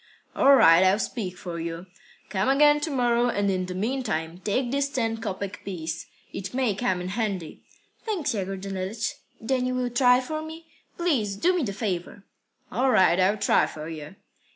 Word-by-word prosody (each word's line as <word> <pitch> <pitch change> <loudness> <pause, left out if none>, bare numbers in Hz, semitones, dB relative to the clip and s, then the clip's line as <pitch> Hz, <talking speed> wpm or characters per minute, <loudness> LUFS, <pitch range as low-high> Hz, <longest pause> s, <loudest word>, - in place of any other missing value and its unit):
"All 275 +1 +6
right, 170 -8 +7
I'll 190 +2 +4
speak 200 -5 -4
for 175 -2 -6
you. 165 +1 -5 0.4
Come 195 +4 0
again 295 +2 +5
to 295 - -3
morrow, 245 -3 +2
and 200 -3 +1
in 185 -1 -1
the 180 - -5
meantime 195 -7 -2
take 240 +6 -1
this 280 0 0
ten 230 -5 -1
kopek 200 -3 -5
piece. 165 -4 -5 0.3
It 195 +3 -6
may 255 -5 +1
come 190 -3 -1
in 180 - -4
handy." 195 -6 -3 0.4
"Thanks, 345 - -1
Yegor 195 -2 -3
Danilych. 195 +3 -3 0.3
Then 255 +2 0
you 255 - -1
will 250 -1 -1
try 250 0 +5
for 310 +5 -4
me? 320 +1 -9 0.3
Please 260 - 0
do 355 - +2
me 355 - +1
the 225 -8 -2
favour." 195 -2 -4 0.5
"All 255 +6 +1
right. 185 -6 +4
I'll 195 +3 +3
try - - +3
for 155 0 -8
you." 155 +1 -8
210 Hz, 180 wpm, -26 LUFS, 185-255 Hz, 0.5 s, right